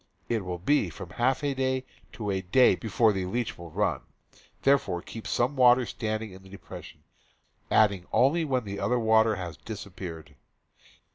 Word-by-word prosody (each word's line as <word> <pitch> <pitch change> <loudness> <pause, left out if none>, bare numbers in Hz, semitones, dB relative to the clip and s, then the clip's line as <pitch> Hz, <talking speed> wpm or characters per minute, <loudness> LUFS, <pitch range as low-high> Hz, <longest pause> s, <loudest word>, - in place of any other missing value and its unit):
It 115 -4 0
will 90 -1 -4
be 100 +2 +2
from 85 +2 -9
half 130 +7 0
a 140 -1 +1
day 130 -1 -1 0.3
to 105 -3 -3
a 95 -1 -1
day 95 +8 +5
before 110 -1 +2
the 95 -2 -2
leach 120 +4 -2
will 85 -1 -10
run. - - 0 0.6
Thereafter 135 -10 +3
keep 110 +4 -9
some 125 +4 0
water 125 -1 +5
standing 110 -2 -3
in 95 +1 -12
the 95 - -16
depression, 100 - -11 0.7
adding 100 -4 +3
only 145 +7 +3
when 130 -5 0
the 100 0 -5
other 105 +5 +1
water 110 -1 +4
has 90 -5 -6
dis 110 -3 -7
appeared. 85 -6 -9
110 Hz, 170 wpm, -28 LUFS, 95-125 Hz, 0.7 s, day